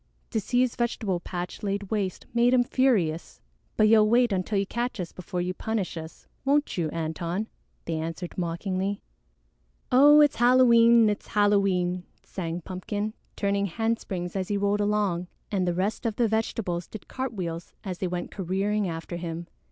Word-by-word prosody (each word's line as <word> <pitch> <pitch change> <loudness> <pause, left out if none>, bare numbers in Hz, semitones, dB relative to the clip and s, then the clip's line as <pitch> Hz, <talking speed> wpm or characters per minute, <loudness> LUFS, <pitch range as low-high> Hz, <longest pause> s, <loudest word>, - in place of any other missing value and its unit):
To 225 - +1
see 245 +5 +1
his 255 -2 +1
vegetable 220 -6 -1
patch 175 0 -6
laid 200 -1 -3
waste 200 -4 -2
made 240 +1 +4
him 245 - +5
furious. 225 -12 +1 0.4
"But 215 - +5
you'll 215 -1 +5
wait 240 0 +4
until 195 +2 0
you 195 - +1
catch 240 +2 -3
us 175 -2 -4
before 180 0 -4
you 180 +1 -2
punish 215 -1 -3
us, 160 0 -9 0.2
won't 285 +2 +2
you, 165 -3 -1
Antone?" 165 +5 -3 0.4
they 165 -1 -2
answered 165 +2 -5
mockingly. 185 +3 -2 0.9
"Oh, 290 +4 +8
it's 295 -1 +5
Halloween! 235 -2 +6
It's 210 0 -2
Halloween!" 195 -4 +2 0.2
sang 170 -2 -4
Pumpkin, 205 +4 -4 0.2
turning 200 0 0
handsprings 195 -3 -2
as 190 -2 -1
he 205 - 0
rolled 205 +1 +1
along, 205 -4 0 0.2
and 190 -3 0
the 175 - 0
rest 205 +6 -1
of 220 - -2
the 235 0 +2
vegetables 215 -5 -1
did 215 - -10
cartwheels 185 -10 -5
as 185 -3 -5
they 185 - -1
went 175 0 -4
careering 195 +2 -1
after 165 +1 -5
him. 170 0 -5
200 Hz, 165 wpm, -26 LUFS, 175-225 Hz, 0.9 s, Oh